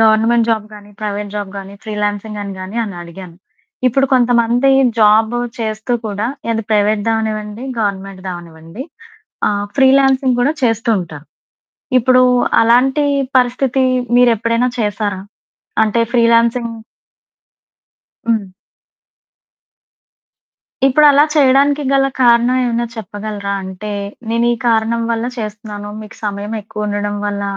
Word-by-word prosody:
Government 225 +1 +3
job 220 -1 -1
గాని, 205 0 -13
private 205 -1 -4
job 205 -2 -4
గాని, 195 0 -8
freelancing 210 0 -3
అని 200 -1 -6
గాని 185 +4 -7
అని 200 -3 -7
అడిగాను. 170 0 -11 0.5
ఇప్పుడు 270 +2 +2
కొంతమంది 245 0 +3 0.3
జాబ్ 220 +2 +4 0.2
చేస్తూ 220 +1 -3
కూడా. 205 +1 -2 0.2
ఏది 225 0 -1
ప్రైవేట్ 210 0 +2
దావనివ్వండి, 220 0 -2 0.2
గవర్నమెంట్ 195 -2 -3
దవనివ్వండి. 170 +3 -8 0.6
ఆహ్, 205 0 -1
ఫ్రీలాన్సింగ్ 265 -1 +4
కూడా 275 +5 +2
చేస్తూ 230 -1 +1
ఉంటారు. 155 -4 -9 0.7
ఇప్పుడు 255 +1 +4 0.4
అలాంటి 255 +5 +3 0.3
పరిస్థితి 255 +1 +1 0.3
మీరెప్పుడైనా 230 0 +3
చేశారా? 205 -2 -2 0.6
అంటే 220 +2 0
ఫ్రీలాన్సింగ్ 235 0 +3 1.6
హ్మ్. 225 -3 +1 2.4
ఇప్పుడలా 290 +1 +5
చేయడానికి 285 0 +3
గల 275 0 +3 0.2
కారణం 240 +1 +4
ఏమైనా 235 -1 0
చెప్పగలరా? 205 -1 -5
అంటే 190 +3 -7 0.4
నేను 230 +1 +1
ఈ - - -2
కారణం 230 0 +1
వల్ల 230 0 -1
చేస్తున్నాను. 210 -1 -6
మీకు 215 0 -12
సమయం 205 +2 -4
ఎక్కువ 210 0 -6
ఉండడం 205 0 -2
వల్ల 205 0 -3
220 Hz, 110 wpm, -16 LUFS, 205-240 Hz, 2.4 s, ఇప్పుడలా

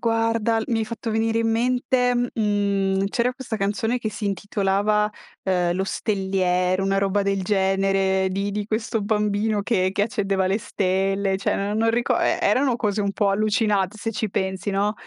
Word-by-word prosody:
Guarda, 225 -1 +1
l - - -3
mi 230 - +1
hai 220 - 0
fatto 230 +1 -5
venire 225 +1 +1
in 225 0 +1
mente 250 +2 +1
mhmm, 200 -5 0
c'era 240 +4 0
questa 250 -3 -5
canzone 215 +4 -1
che 220 -3 -3
si 210 0 -4
intitolava, 205 +1 0 0.3
uhm, 180 -2 +1
Lo 185 +2 -1
Stelliere, 190 -2 0
una 195 0 +1
roba 200 +1 +1
del 195 -1 0
genere, 195 -1 +1
di 195 +2 -2
di 205 0 -3
questo 220 +1 -1
bambino 210 0 0
che 190 -4 +1
che 200 - 0
accendeva 195 -4 0
le 195 +3 +1
stelle 195 -1 0
cioè, 195 - 0
no 200 +1 -2
non 225 +1 +2
rico 240 +1 +1
e - - +1
erano 260 -2 +2
cose 210 -3 -1
un 200 -1 -1
pò 200 -1 +1
allucinat 210 -1 +1
se 225 +2 -3
ci 220 0 -2
pensi, 190 +1 -2
no, 200 +2 +1
205 Hz, 180 wpm, -23 LUFS, 195-225 Hz, 0.3 s, non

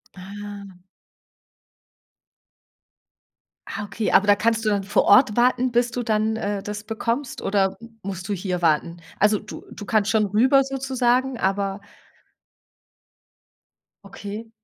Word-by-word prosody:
Ah. 200 0 -9 2.9
Ah, 210 - -5
okay, 205 +2 -3
aber 195 - +5
da 205 0 +5
kannst 225 +1 0
du 215 - +3
dann 200 -1 0
vor 195 - +2
Ort 210 +1 +5
warten, 250 +1 +2
bis 240 0 +1
du 245 - -3
dann, 220 0 0
äh, 205 -2 -3
das 210 0 -6
bekommst 230 +4 -3
oder 195 -1 0 0.2
musst 190 -1 -6
du 205 - -1
hier 185 -2 -3
warten? 165 +1 +1 0.2
Also 210 0 +3
du 210 - -10
du 205 - -9
kannst 215 -2 +1
schon 220 -1 +3
rüber 255 +7 +4
sozusagen, 260 -1 0
aber 195 -1 -1 2.3
Okay. 205 +3 -8
210 Hz, 125 wpm, -23 LUFS, 195-235 Hz, 2.9 s, aber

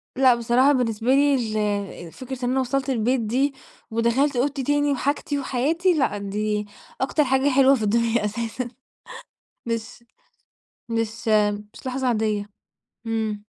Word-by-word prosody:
لأ، 255 -1 +5
بصراحة 240 +4 +3
بالنسبة 230 -3 -1
لي 285 0 +4 0.7
ال 165 - -11
فكرة 255 +2 -6
إن 245 - 0
أنا 265 - +1
وصلت 265 +1 -1
البيت 250 +1 +1
دي، 260 +6 0 0.4
ودخلت 235 +5 +1
أوضتي 270 +2 0
تاني 290 +2 +2
وحاجتي 285 +1 -1
وحياتي 320 +8 +1
لأ، 265 -9 0
دي 210 +1 -2 0.4
أكتر 290 +3 +2
حاجة 265 +1 +2
حلوة 270 0 +5
في 225 - -3
الدنيا 230 +1 +1
أساسًا 235 +3 -3 1.0
مش 230 0 -4 0.9
مش 225 0 -3 0.5
مش - - -14
لحظة 260 0 -2
عادية، 215 -3 0 0.6
امم. 220 -2 -2
245 Hz, 130 wpm, -23 LUFS, 225-270 Hz, 1.0 s, لأ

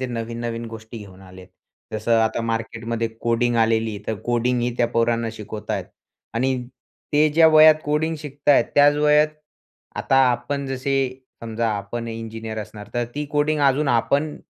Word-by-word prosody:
ते 130 - -2
नवीन-नवीन 115 0 -4
गोष्टी 110 0 -9
घेऊन 95 -2 -12
आले 95 -1 -13
आहेत. 90 - -14 0.4
जसं 110 +2 +1
आता 110 +1 0
मार्केटमध्ये 115 0 -3
कोडिंग 120 +1 +1
आलेली, 110 -2 +1
तर 110 - -1
कोडिंगही 120 0 0
त्या 120 - +2
पोरांना 115 0 0
शिकवत 105 -1 -8
आहेत. - - -1 0.5
आणि 130 +3 +1 0.6
ते 150 +1 +4
ज्या 160 +2 +5
वयात 155 0 +8
कोडिंग 150 +2 0
शिकत 145 -1 -8
आहेत, 145 - +6
त्याच 145 0 +6
वयात 150 +1 +4 0.7
आता 135 - +1
आपण, 135 +4 -3
जसे 135 0 -1 0.3
समजा 115 0 -2
आपण 115 +4 -5
इंजिनिअर 115 -1 -6
असणार, 105 0 -8
तर 120 - 0
ती 150 +1 -2
कोडिंग 150 0 +1
अजून 140 +2 +1
आपण, 140 +6 +1
120 Hz, 155 wpm, -22 LUFS, 115-140 Hz, 0.7 s, वयात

